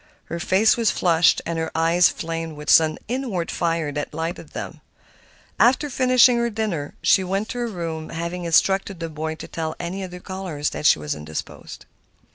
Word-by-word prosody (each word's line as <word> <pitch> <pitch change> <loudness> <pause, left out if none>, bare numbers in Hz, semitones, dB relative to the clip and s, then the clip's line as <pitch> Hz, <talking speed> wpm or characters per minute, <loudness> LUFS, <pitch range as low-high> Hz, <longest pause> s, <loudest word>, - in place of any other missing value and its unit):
Her 170 - -4
face 195 +7 +3
was 230 -2 +2
flushed 170 -2 +3
and 165 0 -2
her 160 - -2
eyes 165 +2 +4
flamed 165 -1 -5
with 150 +1 -1
some 155 -1 +5
inward 230 -9 -2
fire 165 -3 -1
that 145 +1 -5
lighted 165 +2 -4
them. - - -7 0.8
After 265 +4 +3
finishing 255 -1 +5
her 235 0 +1
dinner 205 -10 -3
she 190 - +4
went 195 +4 -2
to 245 - -4
her 240 - -1
room, 165 -6 -5
having 170 +2 -4
instructed 190 +3 +2
the 165 -1 -4
boy 155 0 -4
to - - -9
tell 160 -1 -4
any 185 +3 -4
other 180 -1 -7
callers 180 -6 -4
that 150 - 0
she - - +6
was 75 -1 -3
indisposed. 75 +1 -8
170 Hz, 180 wpm, -23 LUFS, 160-195 Hz, 0.8 s, she